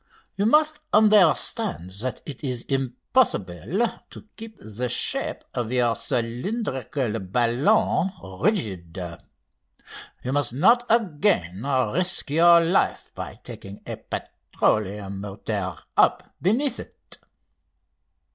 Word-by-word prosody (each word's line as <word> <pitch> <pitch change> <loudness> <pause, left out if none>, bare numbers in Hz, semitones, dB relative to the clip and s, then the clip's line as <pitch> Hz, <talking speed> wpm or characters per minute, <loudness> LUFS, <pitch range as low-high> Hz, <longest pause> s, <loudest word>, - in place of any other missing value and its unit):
You 200 +2 +1
must 305 +4 +3
understand 210 - +3
that 130 +1 -4
it 145 -1 -8
is 125 -4 -2
impossible 135 - 0 0.2
to - - -13
keep 220 -1 -10
the 115 +4 -4
shape 125 - 0
of 120 -1 -3
your 120 -2 +2
cylindrical 125 - -2
balloon 120 - +2 0.3
rigid. 95 - -1 1.3
You 130 - -2
must 145 -4 +1
not 235 - +4
again 175 - +1 0.3
risk 180 -4 +1
your 170 +2 +7
life 170 +3 0
by - - -8
taking 100 +1 -10
a - - -4
petroleum 100 -2 -2
motor 100 -2 -4 0.2
up - - +2
beneath 240 +7 +1
it." - - -11
135 Hz, 100 wpm, -24 LUFS, -, 1.3 s, your